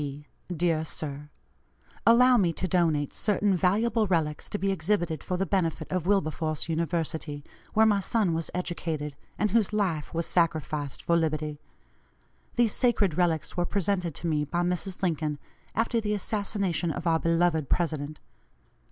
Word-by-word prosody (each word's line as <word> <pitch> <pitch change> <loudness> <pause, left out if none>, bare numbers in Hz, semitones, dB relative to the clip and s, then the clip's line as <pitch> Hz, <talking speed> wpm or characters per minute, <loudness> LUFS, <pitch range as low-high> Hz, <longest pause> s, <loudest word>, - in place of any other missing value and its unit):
D. 145 0 -6 0.3
DEAR 165 -2 +1
SIR: 150 -2 -5 0.8
Allow 250 +2 +7
me 180 -6 +3
to 185 - -2
donate 160 -5 +1
certain 205 -1 +1
valuable 215 +5 +2
relics, 160 -5 0
to 205 - -2
be 195 -1 0
exhibited 175 -3 0
for 180 - -2
the 195 - 0
benefit 175 -3 0
of 185 -2 -1
Wilberforce 155 -5 0
University, 160 -2 -2 0.3
where 220 +1 +6
my 210 -2 +4
son 195 -2 +1
was 165 -1 -2
educated, 160 -5 -3 0.2
and 210 -1 +1
whose 220 -2 +2
life 185 -8 -1
was 165 0 -1
sacrificed 155 -4 0
for 170 - +2
liberty. 155 -2 -1 1.0
These 235 -3 +3
sacred 215 - +2
relics 170 -3 0
were 175 - +1
presented 180 -3 -1
to 170 - -4
me 150 -2 +1
by 175 +4 -1
Mrs. 180 +2 -2
Lincoln, 155 -4 0 0.4
after 230 +1 +1
the 210 -1 0
assassination 200 -4 -1
of 160 - -4
our 165 -1 +3
beloved 165 -3 +2
President. 155 -3 -1
170 Hz, 150 wpm, -28 LUFS, 155-200 Hz, 1.0 s, Allow